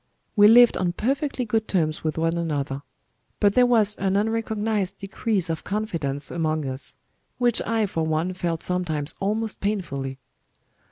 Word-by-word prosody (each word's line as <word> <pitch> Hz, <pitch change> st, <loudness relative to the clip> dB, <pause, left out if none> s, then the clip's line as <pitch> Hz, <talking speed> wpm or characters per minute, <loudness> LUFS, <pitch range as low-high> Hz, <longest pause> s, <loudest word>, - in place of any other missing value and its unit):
We 205 Hz, -1 st, +7 dB
lived 240 Hz, +2 st, +7 dB
on 180 Hz, -2 st, 0 dB
perfectly 270 Hz, -, -1 dB
good 220 Hz, 0 st, -1 dB
terms 155 Hz, -5 st, 0 dB
with 155 Hz, 0 st, -2 dB
one 165 Hz, +1 st, +1 dB
another; 145 Hz, -5 st, -2 dB, 0.6 s
but 205 Hz, -1 st, +3 dB
there 250 Hz, +2 st, +5 dB
was 220 Hz, -4 st, +4 dB
an 195 Hz, 0 st, 0 dB
unrecognized 215 Hz, -2 st, -1 dB
decrease 195 Hz, -1 st, -1 dB
of 165 Hz, -1 st, -3 dB
confidence 165 Hz, -10 st, -3 dB
among 155 Hz, -2 st, -1 dB
us, 130 Hz, +1 st, -6 dB, 0.4 s
which 240 Hz, -2 st, +4 dB
I 225 Hz, -1 st, +1 dB
for 165 Hz, -5 st, -2 dB
one 160 Hz, +3 st, -1 dB
felt 170 Hz, -3 st, -3 dB
sometimes 160 Hz, -5 st, 0 dB
almost 215 Hz, +2 st, -2 dB
painfully. 140 Hz, -10 st, -3 dB
190 Hz, 150 wpm, -24 LUFS, 160-220 Hz, 0.6 s, We